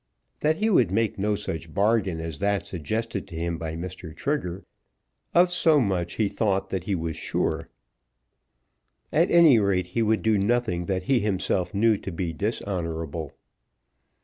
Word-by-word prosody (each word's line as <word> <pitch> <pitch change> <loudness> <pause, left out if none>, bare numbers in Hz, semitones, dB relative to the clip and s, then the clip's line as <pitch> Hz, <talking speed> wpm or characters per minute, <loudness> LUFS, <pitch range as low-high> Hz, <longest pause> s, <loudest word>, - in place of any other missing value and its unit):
That 155 +1 +2
he 215 - +1
would 125 - +4
make 110 +2 0
no 105 +1 +1
such 80 -5 -6
bargain 100 -4 +2
as 80 -3 -5
that 100 0 0
suggested 105 +7 -3
to 85 - -10
him 85 0 -2
by 80 -1 -4
Mr. 85 -1 -7
Trigger, 95 - -3 0.7
of 175 +1 +5
so 160 -3 +4
much 95 -6 -1
he 110 - +1
thought 95 -2 0
that 95 -2 -3
he 100 - 0
was 80 -2 -3
sure. - - -2 1.4
At 165 +4 +3
any 165 -8 +7
rate 95 -3 +1
he 115 - +1
would 110 0 +1
do 110 -2 +3
nothing 100 -5 0
that 95 -2 -1
he 130 +4 +2
himself 95 -2 -1
knew 110 +1 +4
to - - -6
be 85 0 -3
dishonourable. 85 - -3
100 Hz, 160 wpm, -25 LUFS, 85-115 Hz, 1.4 s, any